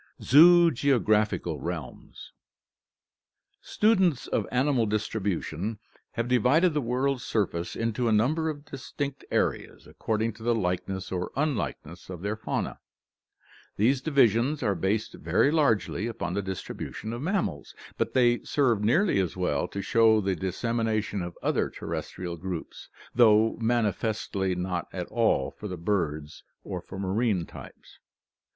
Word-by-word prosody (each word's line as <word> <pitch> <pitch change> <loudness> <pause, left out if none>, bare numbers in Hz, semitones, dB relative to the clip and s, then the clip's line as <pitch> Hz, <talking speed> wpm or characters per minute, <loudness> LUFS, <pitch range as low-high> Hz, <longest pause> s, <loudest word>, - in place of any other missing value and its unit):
ZOOGEOGRAPHICAL 130 - +4
REALMS 85 -4 -7 1.3
Students 190 - +2
of - - -1
animal 125 -2 +2
distribution 105 -2 -2 0.4
have 115 0 -2
divided 130 - +3
the 150 - 0
world's 130 +2 -1
surface 90 -6 -2
into 115 +1 -1
a - - +2
number 150 +10 +2
of 145 -1 -6
distinct 140 +1 -5
areas - - -1
according 110 0 -2
to 110 - -17
the 120 +1 +1
likeness 95 -1 -2
or 90 -1 -3
unlike 140 -4 -1
ness 85 +4 -13
of 90 -1 -7
their 105 +1 -1
faunae. 110 - -3 1.0
These 125 +6 +2
divisions 135 -1 +2
are 105 -4 +2
based 100 +5 -1
very 140 - +1
largely 115 -8 +1
upon 100 -6 -4
the 100 - -1
distribution 95 +3 -6
of 120 - -5
mammals, 165 - -2 0.2
but - - -2
they 120 -2 +4
serve 120 -8 +1
nearly 155 - +3
as 95 -2 -2
well 80 -6 0
to 100 - -5
show 115 -1 +4
the 95 -2 0
dissemination 110 +2 -1
of 85 -1 -6
other - - +1
terrestrial 85 -2 -5
groups, 90 -1 -7 0.2
though 110 -2 +5
manifestly 105 -4 0
not 90 -2 -3
at - - -4
all 65 - +1
for 105 - -8
the 90 -2 -5
birds 80 -5 -2 0.2
or - - -5
for - - -10
marine 100 -1 0
types. - - -13
110 Hz, 135 wpm, -27 LUFS, 95-125 Hz, 1.3 s, though